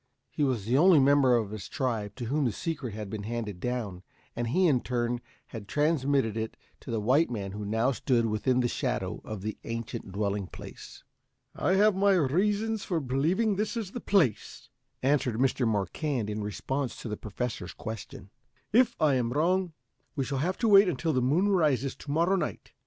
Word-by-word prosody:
He 150 - -1
was 125 -8 0
the 125 +5 +2
only 180 0 +7
member 135 -2 +5
of 110 -4 -1
his 110 -2 -7
tribe 115 -7 -2
to 125 - -5
whom 140 +4 0
the 120 - +1
secret 140 - -4
had 105 -1 -5
been 105 +1 -5
handed 105 -3 -4
down, 110 -6 -3 0.3
and 120 0 -2
he 180 +11 +2
in 135 -8 +3
turn 120 -1 -1 0.3
had 110 -4 -8
transmitted 140 -3 +1
it 110 0 -4 0.2
to - - -12
the 115 -2 -1
white 130 +10 +3
man 100 -5 -4
who 105 +2 -6
now 110 +5 +1
stood 125 -2 +1
within 115 +4 +1
the 120 - +1
shadow - - -2
of 105 -3 -7
the 110 0 -4
ancient 115 -4 -5
dwelling 100 -1 -2
place. - - -11 0.5
"I 185 - +1
have 210 +1 +4
my 200 +1 +4
reasons 200 +7 +1
for 175 -4 -1
believing 160 - +1
this 210 +2 -1
is 210 -5 -4
the 245 - -5
place," 180 - 0 0.3
answered 135 -4 +2
Mr. 125 0 +1
Marquand, 110 - -1
in 105 +1 -3
response 125 +6 -3
to - - -5
the 105 - -3
Professor's 105 -3 -5
question. 100 -3 -8 0.4
"If 245 +1 +4
I 150 -3 +4
am 120 -2 0
wrong, 175 +5 +1 0.4
we 135 -3 -1
shall 135 0 -2
have 180 +6 -1
to 230 - +3
wait 200 -2 +7
until 160 +1 -1
the 130 - +2
moon 155 +11 +2
rises 150 -8 +2
to - - -11
morrow 170 +6 +2
night. - - -4
130 Hz, 190 wpm, -28 LUFS, 110-165 Hz, 0.5 s, only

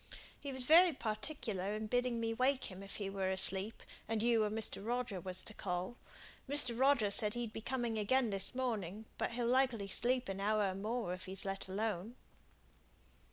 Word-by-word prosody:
"He 280 - -5
was 260 -1 +1
very 335 +3 +7
particular 215 -4 -3
in 215 0 -3
bidding 245 +1 0
me 225 0 -1
wake 255 0 0
him 185 +1 -9
if 195 0 -8
he 200 - -3
were 195 -1 -2
asleep, 190 +2 +4 0.2
and 225 -1 -1
you 230 -2 +3
or 210 - 0
Mr. 215 -2 -3
Roger 235 -4 -2
was 185 +1 -3
to 220 - -3
call. 185 +3 -3 0.5
Mr. 280 -4 +3
Roger 250 -5 +3
said 210 +1 +4
he'd 235 -2 -4
be 225 - -6
coming 240 -2 -2
again 240 +2 +2
this 195 +5 -2
morning 220 -5 -3
but - - -1
he'll 240 0 -1
likely 245 -5 +1
sleep 250 +5 0
an 195 0 -4
hour 210 +1 +1
or - - -5
more, 210 0 -3
if 185 - -7
he's 190 +1 -2
let 195 0 -3
alone." 210 +2 -3
220 Hz, 190 wpm, -35 LUFS, 195-245 Hz, 0.5 s, very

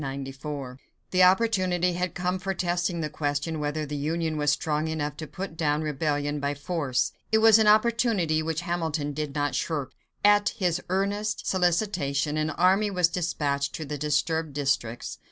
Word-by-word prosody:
The 185 - +3
opportunity 185 -2 +3
had 180 0 -2
come 180 +1 -1
for 195 +1 -3
testing 175 -1 -1
the 155 - -2
question 150 +2 -2
whether 150 +1 -2
the 150 0 -5
Union 160 +2 -1
was 145 -1 +2
strong 150 +1 -1
enough 150 -2 -2
to 155 - -6
put 185 +3 -6
down 155 -1 0
rebellion 145 0 -1
by 140 0 -1
force. 145 -4 -1 0.2
It 220 - +5
was 225 0 +7
an 220 - +3
opportunity 215 -7 +3
which 160 0 -2
Hamilton 160 -4 -2
did 150 -1 -4
not 145 -1 0
shirk. 150 -5 -2 0.3
At 205 0 +4
his 180 -4 0
earnest 205 +3 -1
solicitation, 170 -6 0
an 155 0 0
army 185 +6 +3
was 180 -3 +2
dispatched 145 -5 -1
to 155 - -5
the 145 0 -5
disturbed 150 +1 0
districts. 135 -5 -2
160 Hz, 160 wpm, -26 LUFS, 145-185 Hz, 0.3 s, was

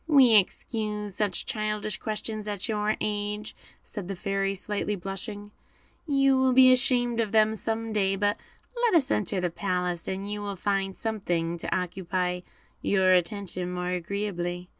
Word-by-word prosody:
"We 270 -7 +7
excuse 210 0 +1
such 200 -2 -1
childish 215 -1 -2
questions 215 0 -4
at 205 0 -2
your 215 -1 0
age," 210 0 -2 0.3
said 200 -4 -7
the 195 - -3
Fairy, 195 +1 -1
slightly 205 +1 -2
blushing; 205 +2 -6 0.6
"you 275 -2 +4
will 260 -1 +4
be 255 0 +8
ashamed 245 -2 +2
of 220 -3 0
them 220 0 +4
some 225 +1 -2
day; 195 -2 +2
but 205 +1 +1 0.4
let 475 -5 +2
us 280 -4 +3
enter 200 -2 +1
the 180 -1 -1
palace, 180 -2 -2
and 195 +1 -3
you 210 0 -3
will 200 -1 -4
find 195 0 -1
something 175 -7 -1
to - - -1
occupy 180 0 -2 0.4
your 190 -2 +4
attention 180 0 0
more 180 0 -2
agreeably." 180 -1 -3
205 Hz, 155 wpm, -27 LUFS, 185-220 Hz, 0.6 s, be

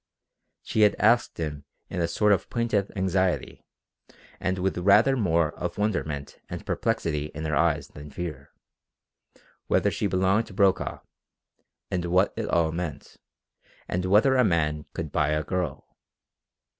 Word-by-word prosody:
She 110 - 0
had 105 -1 +5
asked 120 +3 +3
him 75 -3 -4 0.2
in 90 - -3
a 85 - +1
sort 105 +5 +2
of 95 - -1
plaintive 115 -4 0
anxiety 95 -1 0 0.8
and 95 0 -1
with 95 +1 -1
rather 105 +9 +5
more 85 - +1
of - - -5
wonderment 80 -9 -2
and - - -7
perplexity 75 -3 -1
in 80 +1 -4
her 80 -1 0
eyes - - +1
than 75 0 -11
fear, 75 -2 -6 1.2
whether - - +2
she 105 - -1
belonged 95 +4 +1
to 100 - -12
Brokaw, 100 -2 +1 0.9
and 90 -2 -1
what 90 +3 +2
it - - -3
all 80 -2 +2
meant, 80 -4 -6 0.7
and 90 +1 -2
whether 110 +8 +4
a 125 - +5
man 75 -6 0
could 80 -3 -4
buy 75 0 +1
a 75 0 0
girl. 85 -3 -3
90 Hz, 145 wpm, -26 LUFS, 80-100 Hz, 1.2 s, had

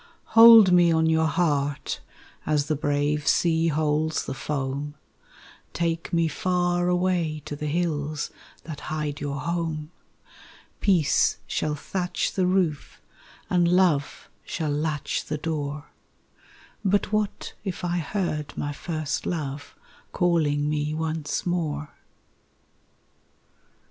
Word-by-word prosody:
_ - - -24 0.3
Hold 225 -4 +9
me 175 -1 +5
on 160 0 +3
your 160 0 +3
heart 145 -4 0 0.4
as 150 -2 +1
the 155 - 0
brave 145 +1 0
sea 165 -1 +3
holds 155 0 0
the - - -4
foam, 140 +1 -3 0.8
Take 165 0 -2
me 170 -2 +2
far 175 +2 0
away 175 -4 0
to 145 - -5
the 150 +1 -4
hills 150 -2 -2 0.3
that 155 -3 -7
hide 150 -1 -3
your 145 0 -3
home; 165 -2 -3 0.9
Peace 175 -8 +3
shall 150 -1 -1
thatch 180 +4 -2
the 185 -2 +1
roof 180 -6 0 0.5
and 175 -1 +2
love 170 -6 +2 0.2
shall 155 -3 -3
latch 150 0 -2
the 150 - -3
door 150 -2 -4 0.9
_But 205 +1 +1
what 215 -1 -2
if 190 -3 -4
I 175 0 0
heard 160 -4 -3
my 145 - -2
first 155 -1 -3
love 145 -4 -4 0.4
calling 155 -5 +1
me 150 0 -1
once 160 -1 -2
more? 155 -4 -2
155 Hz, 120 wpm, -25 LUFS, 150-175 Hz, 0.9 s, Hold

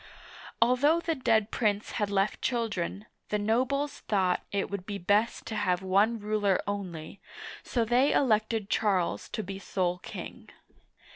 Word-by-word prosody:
Al 250 +2 +3
though 300 +6 +4
the 335 -1 -1
dead 225 -6 +1
prince 210 -2 0
had 210 -1 -1
left 200 +1 0
children, 215 -5 -2 0.2
the 210 - +1
nobles 255 +7 0
thought 190 -4 +2
it 200 0 -1
would 200 -2 -5
be 205 -1 -3
best 205 +5 +1
to 220 - -5
have 185 -3 0
one 200 +5 +3
ruler 205 -2 +1
only, 190 -4 -5 0.4
so 235 -3 -1
they 250 +5 +3
elected 220 -5 +2
Charles 195 -5 0
to 215 - -3
be 195 0 -6
sole 180 -2 -1
king. - - -9
210 Hz, 150 wpm, -29 LUFS, 195-230 Hz, 0.4 s, though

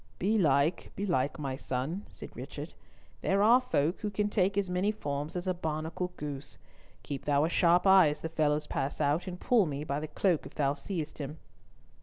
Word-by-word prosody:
"Belike, 170 -6 +2
belike, 170 -9 0
my 135 -3 -3
son," 135 +10 -3
said - - -9
Richard. - - -7 0.5
"There 195 +1 +2
are 240 +4 +6
folk 175 - 0
who 210 - -2
can 205 +1 0
take 200 -1 +1
as 200 -1 +1
many 180 +3 +1
forms 145 -6 -4
as 180 - -3
a 185 - +1
barnacle 160 +1 -3
goose. 145 -1 -6 0.5
Keep 135 +1 -5
thou 145 0 +3
a - - 0
sharp 175 +1 +4
eye 190 -4 +7
as 150 - -5
the - - -2
fellows 150 -2 +1
pass 140 -1 -3
out, 150 +5 +1
and 180 -1 -5
pull 225 -7 +3
me 145 0 -3
by 140 -1 -2
the 155 - -4
cloak 165 +2 0
if - - -16
thou 140 -2 +2
seest 155 +1 -5
him." 145 +2 -5
160 Hz, 195 wpm, -30 LUFS, 145-190 Hz, 0.5 s, eye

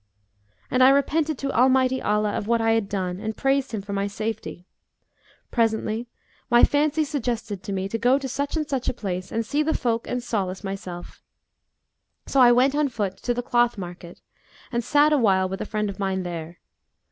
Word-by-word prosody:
And 255 - +2
I 260 - +8
repented 295 +2 +2
to 275 +1 -3
Almighty 260 +1 +3
Allah 210 0 +1
of 205 - -3
what 235 0 +2
I 225 0 +2
had 225 -3 +1
done 185 -2 -2
and 220 +1 -4
praised 270 0 +1
Him 215 -4 -4
for 200 0 -6
my 200 0 0
safety. 210 -3 -5 0.9
Presently 225 0 0 0.4
my 240 -1 +5
fancy 300 +2 +3
suggested 235 - -3
to 200 - -6
me 190 0 -2
to 225 +3 -3
go 250 +4 +4
to 275 -1 -4
such 280 +4 -2
and 305 -1 -2
such 270 -4 -1
a - - -4
place 185 -4 -4
and 225 0 -1
see 290 +6 0
the 315 +1 0
folk 230 -2 -1
and 250 -1 -3
solace 195 -5 -3
myself; 185 -3 -7 1.0
so 275 - +2
I 245 -1 +8
went 255 +3 +4
on 295 -1 +1
foot 205 -6 -3
to 245 - -2
the 245 - -2
cloth 240 -1 +2
market 175 -2 -9 0.5
and 235 -1 -1
sat 295 +4 +4
awhile 195 -9 +3
with 190 +1 -5
a - - -4
friend 210 -1 -1
of 200 0 -6
mine 190 -1 -1
there. 170 -1 -6
230 Hz, 195 wpm, -24 LUFS, 195-260 Hz, 1.0 s, I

